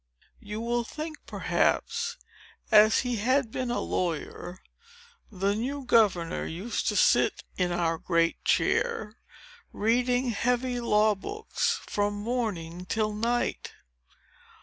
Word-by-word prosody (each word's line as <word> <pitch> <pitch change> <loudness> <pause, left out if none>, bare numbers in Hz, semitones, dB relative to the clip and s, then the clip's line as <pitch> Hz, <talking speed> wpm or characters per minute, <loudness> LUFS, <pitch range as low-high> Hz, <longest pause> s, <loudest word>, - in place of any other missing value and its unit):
You 210 +2 -6
will 240 +1 0
think, 310 +6 -7
perhaps, 470 +1 0 0.5
that, 210 0 +9
as 220 - +2
he 245 -2 -2
had 255 +2 +1
been 255 0 -3
a 240 - 0
lawyer, 175 +1 -3 0.7
the 195 0 0
new 265 +6 -3
governor 195 -8 +2
used 190 +9 -3
to - - +1
sit - - +3
in 180 -1 0
our 165 -2 0
great 170 -1 +1
chair, 225 - +1 0.5
reading 245 +3 +1
heavy 245 +2 0
law 215 -2 +3
books 435 - -2
from 205 0 -1
morning 205 -6 -3
till 215 0 0
night. 235 +3 -1
225 Hz, 120 wpm, -28 LUFS, 200-250 Hz, 0.7 s, that